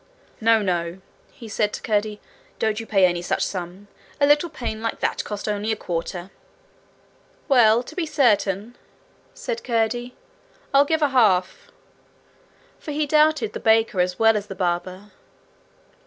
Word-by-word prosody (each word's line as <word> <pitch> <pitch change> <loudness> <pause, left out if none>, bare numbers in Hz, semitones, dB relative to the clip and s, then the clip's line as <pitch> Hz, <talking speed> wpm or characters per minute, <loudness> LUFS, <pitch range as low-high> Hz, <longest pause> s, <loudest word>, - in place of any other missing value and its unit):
'No, 225 -1 +3
no,' 175 -1 -2 0.3
he 235 -6 -12
said 210 0 0
to - - -5
Curdie; 210 -1 -1 0.4
'don't 220 0 0
you 225 - -7
pay 195 -3 +4
any 175 -1 0
such 175 - -1
sum. 185 +2 -6 0.3
A 285 - +5
little 295 +4 +3
pane 230 -8 -5
like 225 - -3
that - - -1
cost 210 0 -6
only 210 +1 -1
a - - 0
quarter.' 175 0 -5 1.2
'Well, 240 -4 +5
to - - -11
be 350 -4 -2
certain,' 220 - +1 0.6
said 485 -1 -5
Curdie, 240 +1 -1 0.6
'I'll 280 +1 +6
give 320 +1 0
a 290 - +3
half.' 210 -9 +2 1.1
For - - -10
he 300 +1 0
doubted 300 -6 +2
the - - -5
baker 220 -3 +2
as 180 0 -1
well 225 0 +4
as 205 -1 -3
the 195 - -7
barber. 185 +2 -3
220 Hz, 155 wpm, -23 LUFS, 195-250 Hz, 1.2 s, I'll